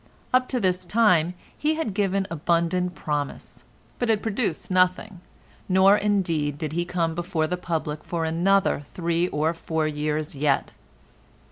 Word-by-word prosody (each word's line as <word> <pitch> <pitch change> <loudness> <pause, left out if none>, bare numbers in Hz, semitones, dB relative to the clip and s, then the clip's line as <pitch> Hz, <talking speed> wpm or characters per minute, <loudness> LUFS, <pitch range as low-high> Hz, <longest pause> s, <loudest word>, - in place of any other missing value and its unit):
Up 255 0 +4
to 255 - 0
this 185 -3 0
time 180 -4 +3 0.2
he 310 +1 0
had 310 -11 -2
given 195 -1 0
abundant 170 +2 0
promise, 145 -2 -4 0.3
but 245 - 0
had 215 -2 +2
produced 220 -2 -2
nothing, 185 +1 +1 0.5
nor 190 +2 +6
indeed 170 -9 0
did 155 0 -4
he 175 +1 -1
come 170 -2 -1
before 170 -1 -1
the 180 - -1
public 160 -4 -3
for 165 -2 -2
another 180 +2 +2
three 170 0 0
or 155 0 0
four 160 -1 -2
years 150 0 -2
yet. 140 0 0
175 Hz, 145 wpm, -25 LUFS, 160-195 Hz, 0.5 s, nor